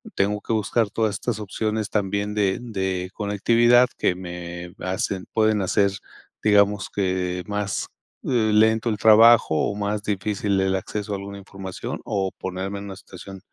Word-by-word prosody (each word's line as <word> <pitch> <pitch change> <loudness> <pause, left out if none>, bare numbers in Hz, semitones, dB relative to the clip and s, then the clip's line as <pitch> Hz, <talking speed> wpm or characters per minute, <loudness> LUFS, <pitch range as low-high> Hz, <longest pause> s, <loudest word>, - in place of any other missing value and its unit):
tengo 105 +1 0
que - - -5
buscar 110 +1 +1
todas 110 -2 0
estas 115 +1 -3
opciones 110 +1 -2
también 100 0 -1
de 100 -2 +1
de 95 -5 -3
conectividad 115 +4 +3
que 90 - +1
me 90 -1 -7
hacen, 95 0 -2
pueden 110 -1 +2
hacer, 100 +1 +2 0.5
digamos, 105 -2 +3
que 90 -2 -1
más, 105 -1 -2 0.4
eh, 115 -4 +1
lento 110 +2 +3
el 105 - -1
trabajo 110 -4 +6
o 100 +6 0
más 105 0 -2
difícil 100 -1 -1
el 95 0 +1
acceso 105 +2 -4
a - - -1
alguna 100 +1 -8
información 95 -1 -7
o 95 -2 -1
ponerme 95 +2 -4
en - - -8
una 95 -2 -8
situación 95 0 -11
100 Hz, 155 wpm, -23 LUFS, 95-110 Hz, 0.5 s, trabajo